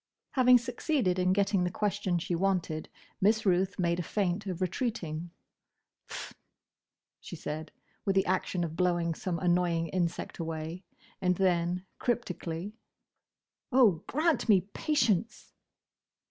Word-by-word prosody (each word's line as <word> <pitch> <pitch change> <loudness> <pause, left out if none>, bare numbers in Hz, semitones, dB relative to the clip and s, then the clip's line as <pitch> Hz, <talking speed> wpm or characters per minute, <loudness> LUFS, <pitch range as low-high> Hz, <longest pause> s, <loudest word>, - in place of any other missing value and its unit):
Having 250 -1 +6
succeeded 240 - 0
in 180 0 +3
getting 195 -1 +2
the 180 - +1
question 205 -2 0
she 170 +1 -3
wanted, 175 -3 0 0.3
Miss 215 +3 +3
Ruth 190 +1 +2
made 170 -1 +1
a - - +1
feint 195 +2 -1
of 180 -2 -3
retreating. 175 -4 -2 0.8
"Pfft!" - - -6 0.9
she - - -8
said, 155 0 -5 0.3
with 195 - 0
the 195 - +4
action 185 -1 0
of 160 -1 -4
blowing 175 -2 +1
some 175 +1 -3
annoying 175 -2 +1
insect 175 0 -2
away, 165 +2 -4 0.4
and 180 -1 +2
then, 180 0 +1
cryptically, 190 -5 -2 1.0
"Oh! 230 -11 +5
grant 310 -3 +1
me 195 -4 +6
patience!" 230 - 0
180 Hz, 125 wpm, -30 LUFS, 170-205 Hz, 1.0 s, Having